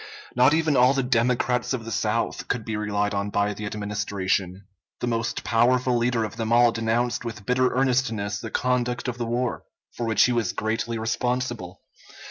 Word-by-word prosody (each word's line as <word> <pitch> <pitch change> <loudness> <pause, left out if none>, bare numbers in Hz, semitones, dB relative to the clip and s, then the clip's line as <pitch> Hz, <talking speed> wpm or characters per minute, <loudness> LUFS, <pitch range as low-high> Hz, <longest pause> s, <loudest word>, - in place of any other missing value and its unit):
Not 130 +4 +5
even 160 -2 +2
all 125 +2 +5
the 135 - +1
Democrats 125 0 +1
of 120 -3 -4
the 115 - -6
South 110 +2 -1
could 120 -3 -2
be 110 - -3
relied 105 -1 -1
on 100 0 -1
by 100 0 0
the 105 0 -6
Administration. 100 -2 -2 0.3
The - - -2
most 115 -1 -2
powerful 125 +2 +2
leader 120 -1 +1
of 110 +1 -5
them 115 -1 -2
all 120 0 +6
denounced 115 +2 0
with 115 -4 -7
bitter 125 +2 +2
earnestness 120 -6 0
the - - -6
conduct 125 -1 -1
of 120 -1 -4
the 120 - -2
war, 120 +1 -1 0.3
for 120 - -3
which 110 -2 +4
he 125 - +1
was 120 -2 0
greatly 115 +2 -2
responsible. 120 -4 -2
115 Hz, 180 wpm, -25 LUFS, 105-125 Hz, 0.3 s, all